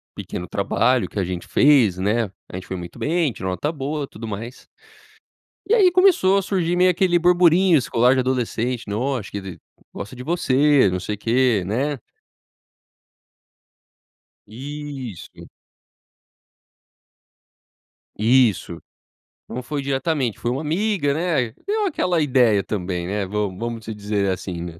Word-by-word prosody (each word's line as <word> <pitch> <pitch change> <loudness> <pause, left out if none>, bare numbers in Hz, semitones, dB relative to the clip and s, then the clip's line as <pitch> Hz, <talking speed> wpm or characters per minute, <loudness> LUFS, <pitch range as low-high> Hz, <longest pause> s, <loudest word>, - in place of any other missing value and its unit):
pequeno 90 - -6
trabalho 115 +6 +1
que - - -4
a - - +1
gente 90 -1 -5
fez, 130 -11 +4
né, 105 +5 +1 0.2
a - - -9
gente 95 -1 -7
foi - - -4
muito 85 -1 -9
bem, 165 -2 +1
tirou 95 - -5
nota 145 +11 -2
boa 145 0 -4
e - - -5
tudo 115 -2 -9
mais. 115 +4 -7 1.0
E 415 - +2
aí 395 -6 +5
começou 350 - +4
a - - +2
surgir 180 -3 -1
meio 180 +1 +4
aquele 180 -1 +2
burburinho 175 0 +4
escolar, 125 -1 +2
de 130 - +1
adolescente, 125 -1 -2
né, 100 - -3
"Ó, 130 +3 -1
acho 100 - -10
que - - -4
ela 95 -2 -8 0.4
gosta 105 - -7
de 125 - -8
você, 145 - +3
não 90 0 -2
sei 105 +3 -4
o - - -18
quê", 115 -1 +2
né. 135 +8 -1 2.5
Isso 135 - -8
q - - -13 2.7
Isso, 110 -7 +2 0.7
não 125 - -5
foi 145 +3 -3
diretamente, 135 -3 -1
foi 120 - -1
uma 130 +3 -2
amiga, 165 -1 0
né, 150 -7 0
deu 420 +1 0
aquela 180 - 0
ideia 125 -8 +3
também, 90 -4 -3
né, 100 +1 -2
vamos 100 -1 -3
vamos 115 -1 -5
se 110 - -5
dizer 105 -1 -1
assim, 95 -2 -4
né, 85 -1 -8
125 Hz, 150 wpm, -22 LUFS, 105-155 Hz, 2.7 s, aí